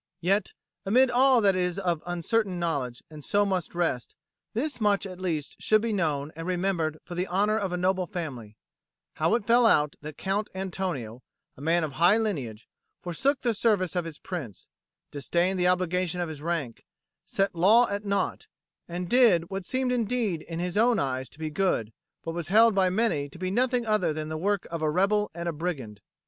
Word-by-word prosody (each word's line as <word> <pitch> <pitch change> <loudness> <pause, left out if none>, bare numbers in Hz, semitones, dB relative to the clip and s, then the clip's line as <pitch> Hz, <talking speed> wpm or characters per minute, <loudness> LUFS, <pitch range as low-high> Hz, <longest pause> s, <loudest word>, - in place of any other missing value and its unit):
Yet, 195 +3 +1 0.3
amid 250 +6 +4
all 255 0 +5
that 195 -2 +4
is 180 0 0
of 175 -5 -1
uncertain 180 +3 0
knowledge 140 -8 -2
and 150 -1 -10
so 205 +5 +2
must 185 -4 -2
rest, 165 -8 -1 0.4
this 255 0 -2
much 205 -1 +2
at 185 -2 -8
least 160 -6 -3
should 215 0 +3
be 230 -1 0
known 155 -6 -1
and 165 +2 -6
remembered 175 -4 0
for 175 - -8
the 180 +2 -2
honour 205 +4 +1
of 195 -3 -2
a 180 - -1
noble 185 0 +1
family, 130 - -6 0.6
how 160 +8 +2
it 235 - -2
fell 235 +1 +5
out 150 -7 +3
that 150 0 -8
Count 200 +2 -1
Antonio, 175 - -4 0.3
a - - -14
man 165 +3 +2
of 155 - -2
high 175 +9 +4
lineage, 135 - -3 0.4
forsook 265 - 0
the 240 -2 +1
service 200 -5 +1
of 175 -2 0
his 160 -3 -7
Prince, 145 - -7 0.4
disdained 175 +6 0
the 180 - +3
obligation 180 -1 0
of 175 -2 -2
his 150 -2 -8
rank, 160 -7 -3 0.4
set 195 +1 0
law 210 +8 +5
at 200 +1 -3
naught, 200 -1 -1 0.4
and 175 +1 -4
did 200 -7 +4
what 195 -2 -4
seemed 260 -1 0
indeed 230 -7 0
in 165 0 -7
his 180 +2 -2
own 235 +2 +4
eyes 130 -1 -2
to - - -13
be 155 -1 -4
good 150 - 0 0.3
but 165 - -3
was 170 -3 -4
held 225 +4 +6
by 190 -1 +3
many 185 -8 0
to 140 - -12
be 185 +1 -3
nothing 250 +2 +1
other 210 -7 +1
than 155 0 -4
the 155 - -4
work 195 +4 0
of 165 -1 -3
a 155 - +1
rebel 200 +6 +2
and 170 0 -4
a 170 - -1
brigand. 140 - -5
180 Hz, 195 wpm, -27 LUFS, 160-205 Hz, 0.6 s, held